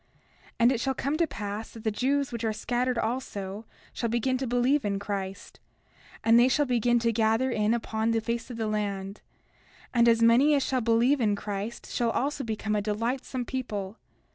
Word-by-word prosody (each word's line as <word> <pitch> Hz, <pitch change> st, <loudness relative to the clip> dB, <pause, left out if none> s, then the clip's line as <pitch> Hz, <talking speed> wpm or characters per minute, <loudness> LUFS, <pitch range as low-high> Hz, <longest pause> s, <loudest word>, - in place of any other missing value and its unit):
30:7 -, -, -42 dB
And 235 Hz, +2 st, +6 dB
it 250 Hz, -, 0 dB
shall 265 Hz, +2 st, 0 dB
come 280 Hz, +4 st, -1 dB
to 335 Hz, 0 st, +2 dB
pass 210 Hz, -2 st, -5 dB
that 225 Hz, -, -12 dB
the 220 Hz, -, +1 dB
Jews 275 Hz, +5 st, 0 dB
which 235 Hz, -1 st, -5 dB
are 220 Hz, -, +1 dB
scattered 245 Hz, +3 st, -1 dB
also 220 Hz, -3 st, -3 dB, 0.3 s
shall 235 Hz, -, -2 dB
begin 240 Hz, +3 st, 0 dB
to 265 Hz, -, -2 dB
believe 245 Hz, +4 st, +2 dB
in 200 Hz, -1 st, -1 dB
Christ; 195 Hz, -1 st, -5 dB, 0.6 s
and 230 Hz, +1 st, +6 dB
they 245 Hz, -, +6 dB
shall 290 Hz, +3 st, +2 dB
begin 240 Hz, -1 st, +2 dB
to 230 Hz, 0 st, +1 dB
gather 225 Hz, +3 st, +2 dB
in 215 Hz, 0 st, +2 dB
upon 220 Hz, -1 st, -1 dB
the 230 Hz, 0 st, +2 dB
face 235 Hz, +2 st, -3 dB
of 240 Hz, -, -7 dB
the 225 Hz, -, -1 dB
land; 200 Hz, -2 st, -3 dB, 0.7 s
and 235 Hz, -1 st, +5 dB
as 230 Hz, 0 st, +3 dB
many 255 Hz, +6 st, +5 dB
as 275 Hz, -, +1 dB
shall 260 Hz, -2 st, 0 dB
believe 240 Hz, +4 st, +3 dB
in 210 Hz, -3 st, +2 dB
Christ 205 Hz, +3 st, -5 dB
shall 235 Hz, -1 st, 0 dB
also 275 Hz, +4 st, -1 dB
become 215 Hz, -2 st, -2 dB
a 210 Hz, -, +1 dB
delightsome 235 Hz, +4 st, -2 dB
people. 215 Hz, -6 st, -4 dB
230 Hz, 195 wpm, -27 LUFS, 215-255 Hz, 0.7 s, And